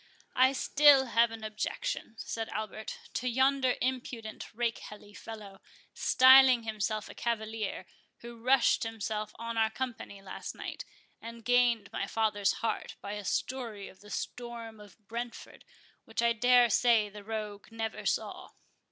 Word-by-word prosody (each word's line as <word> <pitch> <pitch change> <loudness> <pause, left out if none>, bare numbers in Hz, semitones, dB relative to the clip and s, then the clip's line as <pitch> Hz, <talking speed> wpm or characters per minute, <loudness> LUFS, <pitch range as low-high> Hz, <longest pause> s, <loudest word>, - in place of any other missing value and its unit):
"I 260 +1 +5
still 280 0 +5
have 235 -1 +3
an 225 -1 -9
objection," 215 - -4
said 225 0 -4
Albert, 215 0 -5 0.2
"to 250 - -1
yonder 260 +1 +2
impudent 245 -4 -4
rakehelly 215 -3 -4
fellow, 210 -3 -10 0.3
styling 260 -2 +7
himself 215 -1 -2
a - - -10
cavalier, 220 -2 -3 0.4
who 235 -1 -10
rushed 255 +1 +4
himself 215 -1 -3
on 230 0 -3
our 220 0 +3
company 235 -4 -5
last 195 -1 -7
night, - - -6 0.4
and 230 0 -10
gained 240 -4 +2
my - - -2
father's 210 -3 +1
heart - - -2
by 200 - -7
a 210 0 -5
story 225 -1 -3
of 190 - -18
the 210 - -15
storm 230 -1 -6
of 205 -4 -15
Brentford, 235 +1 -7 0.4
which - - -2
I 235 0 +4
dare 245 0 +5
say 235 -3 +4
the 205 0 -11
rogue 210 -1 -5
never 225 -1 -4
saw." - - -2
225 Hz, 145 wpm, -30 LUFS, 215-245 Hz, 0.4 s, styling